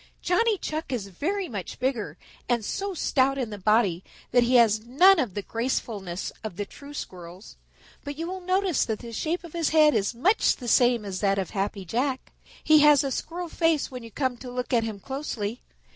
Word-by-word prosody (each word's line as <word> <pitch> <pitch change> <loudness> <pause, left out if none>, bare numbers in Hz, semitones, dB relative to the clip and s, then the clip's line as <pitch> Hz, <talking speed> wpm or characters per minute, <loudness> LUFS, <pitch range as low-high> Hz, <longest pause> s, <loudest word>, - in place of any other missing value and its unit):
"Johnny 425 +4 +2
Chuck 310 -4 -4
is 215 -6 -3
very 365 - -2
much 205 - -6
bigger 235 - -2 0.3
and 235 -3 +1
so 395 - -3
stout 275 -3 +2
in 245 -5 -3
the 205 - -6
body 195 -3 +2 0.3
that 245 - +5
he 240 +2 +2
has 225 -3 +5
none 340 +11 +5
of 230 -11 -1
the 205 - -3
gracefulness 215 -6 -3
of 215 -5 -5
the 205 - -3
true 285 +7 -12
Squirrels. 180 -3 -9 0.5
But 285 0 -6
you 330 - -3
will 375 +1 -5
notice 370 -2 +1
that 220 -2 -2
the 235 0 -10
shape 330 +9 -2
of 340 - -11
his 335 -2 0
head 310 -1 +5
is 215 +1 0
much 385 - +3
the 245 - -9
same 240 -1 +3
as 190 -2 -4
that 195 -1 +2
of 190 -2 -2
Happy 195 -1 -3
Jack. 255 - -2 0.3
He 310 0 +6
has 295 -1 +6
a 275 - -2
Squirrel 345 +6 -4
face 325 -3 +1
when 250 -1 -7
you 230 - -10
come 260 0 -2
to 250 +1 -9
look 250 +1 -4
at 235 -2 +3
him 215 -3 -5
closely. 245 -3 -4
250 Hz, 205 wpm, -26 LUFS, 210-310 Hz, 0.5 s, He